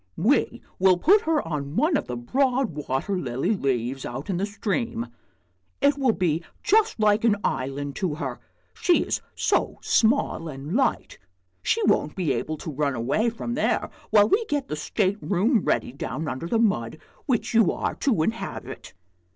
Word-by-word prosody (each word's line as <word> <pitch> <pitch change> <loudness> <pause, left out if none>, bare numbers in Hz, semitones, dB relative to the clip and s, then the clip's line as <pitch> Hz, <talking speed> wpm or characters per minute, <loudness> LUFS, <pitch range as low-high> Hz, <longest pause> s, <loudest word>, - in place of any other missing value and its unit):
We 240 - +1 0.2
will 185 -1 +5
put 390 - +5
her 310 - +1
on 145 -2 -4
one 310 - +2
of - - -1
the 125 - -4
broad 260 - +1
water 145 +6 -2
lily 130 - -1
leaves 130 - -1
out 135 +11 -5
in 180 - -1
the 195 +3 -1
stream; 205 - -2 0.7
it 285 0 +4
will 270 -4 +2
be 170 -4 0 0.2
just 440 - +3
like 215 0 +3
an 225 -3 +4
island 140 +2 -2
to 175 -6 -1
her, 135 -6 -5 0.3
she 350 -1 +2
is - - -2
so - - 0
small 225 -7 +2
and 145 +2 -6
light. 270 - 0 0.4
She - - +1
won't 150 - +2
be 170 -8 0
able 155 +6 -3
to 155 - -6
run 140 -1 -1
away 140 - +1
from 230 +1 -5
there 295 - 0 0.2
while 210 -1 +6
we 435 - +2
get 290 -7 -2
the 150 - -2
state 195 +6 -1
room 210 +6 +2
ready - - 0
down 150 +3 -4
under 130 +5 -4
the 230 - +1
mud, 155 - +1 0.3
which 245 -5 0
you 225 -5 +5
are - - -2
to 220 - +1
inhabit." 225 +6 -5
185 Hz, 175 wpm, -25 LUFS, 140-235 Hz, 0.7 s, while